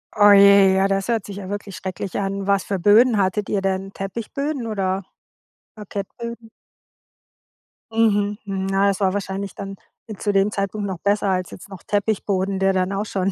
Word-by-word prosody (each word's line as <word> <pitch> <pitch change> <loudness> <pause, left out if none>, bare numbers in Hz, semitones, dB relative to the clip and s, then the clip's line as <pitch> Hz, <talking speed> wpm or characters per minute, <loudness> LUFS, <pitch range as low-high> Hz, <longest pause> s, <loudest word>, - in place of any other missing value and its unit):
Oh 205 -1 +7
je, 200 -1 +7
ja, 190 +1 +3
das 195 -1 -1
hört 225 -4 0
sich 200 - -8
ja 190 -2 -7
wirklich 205 -1 -6
schrecklich 190 0 -5
an. 195 0 -3
Was 200 -1 +2
für 195 -2 -3
Böden 220 +5 +5
hattet 195 +1 0
ihr 200 - 0
denn? 195 0 -2
Teppichböden 235 +7 -4
oder 195 -3 -2 0.7
Parkettböden? 225 +3 -7 1.4
Mhm, 205 -2 +2
hm. 200 -2 -6
Na, 195 +1 +2
das 195 -2 0
war 190 -2 +1
wahrscheinlich 195 -1 -4
dann 195 0 -6 0.4
zu 205 - -1
dem 195 +1 +3
Zeitpunkt 200 0 -3
noch 185 -3 -5
besser 200 +1 +1
als 185 -1 -1
jetzt 190 - -11
noch 190 -4 -11
Teppichboden, 200 -2 -1
der 195 0 +2
dann 185 0 0
auch 200 +1 -2
schon 195 -2 -1
200 Hz, 175 wpm, -22 LUFS, 195-205 Hz, 1.4 s, Oh